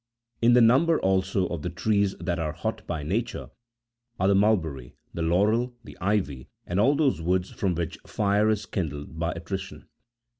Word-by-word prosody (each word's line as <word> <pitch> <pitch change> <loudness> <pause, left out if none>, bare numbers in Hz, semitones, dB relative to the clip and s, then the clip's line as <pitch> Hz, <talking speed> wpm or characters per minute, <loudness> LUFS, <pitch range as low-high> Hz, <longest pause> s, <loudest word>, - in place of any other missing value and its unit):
27 115 - +3
In - - +6
the 120 -2 +7
number, 160 +7 +4
also, 95 0 +1
of 85 -3 -4
the 90 - -3
trees 100 +2 +1
that 85 -2 -2
are 80 -2 -2
hot - - -4
by 75 - -3
nature, 110 +10 -3 0.7
are 95 - +2
the - - +5
mulberry, 85 - +1 0.2
the 85 - -4
laurel, 105 +9 +2
the - - -12
ivy, 90 -10 -1 0.2
and 90 +2 -1
all 135 +8 +4
those 140 - +1
woods 90 +2 0
from 95 -4 -1
which 85 -1 -4
fire 105 +1 +2
is 105 -1 0
kindled 80 -4 -4
by 85 0 0
attrition. 95 +3 -6
95 Hz, 180 wpm, -26 LUFS, 85-110 Hz, 0.7 s, the